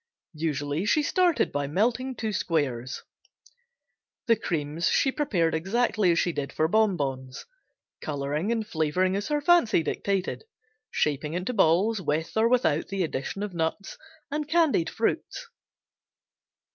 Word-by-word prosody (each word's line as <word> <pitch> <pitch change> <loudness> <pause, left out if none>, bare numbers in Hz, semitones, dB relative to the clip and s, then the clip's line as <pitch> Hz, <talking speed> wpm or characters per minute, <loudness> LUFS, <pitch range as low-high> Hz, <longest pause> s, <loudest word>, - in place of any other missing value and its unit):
Usually 145 0 -1
she 300 +8 +3
started 355 +1 +2
by 145 -1 -2
melting 245 - 0
two 220 -2 -3
squares. 130 - -2 1.2
The 230 - +4
creams 160 -3 -2
she 270 - +2
prepared 180 - 0
exactly 195 +3 +1
as 170 - +1
she 175 - +2
did 140 -3 -4
for 155 - +1
"Bon 215 0 +2
Bons," 130 -3 -4 0.6
coloring 150 +6 -2
and 225 -2 -1
flavoring 185 0 0
as 200 +1 -2
her 295 -1 0
fancy 310 - +4
dictated, 195 - -2 0.5
shaping 150 +1 -1
into 180 +8 -2
balls 195 +2 +3
with 160 -1 -2
or 220 +1 +3
without 240 - +2
the 195 -1 -1
addition 160 +5 -3
of 205 -3 -5
nuts 165 +4 -3 0.3
and 300 0 -2
candied 315 - +3
fruits. 460 - -2
185 Hz, 135 wpm, -26 LUFS, 155-230 Hz, 1.2 s, The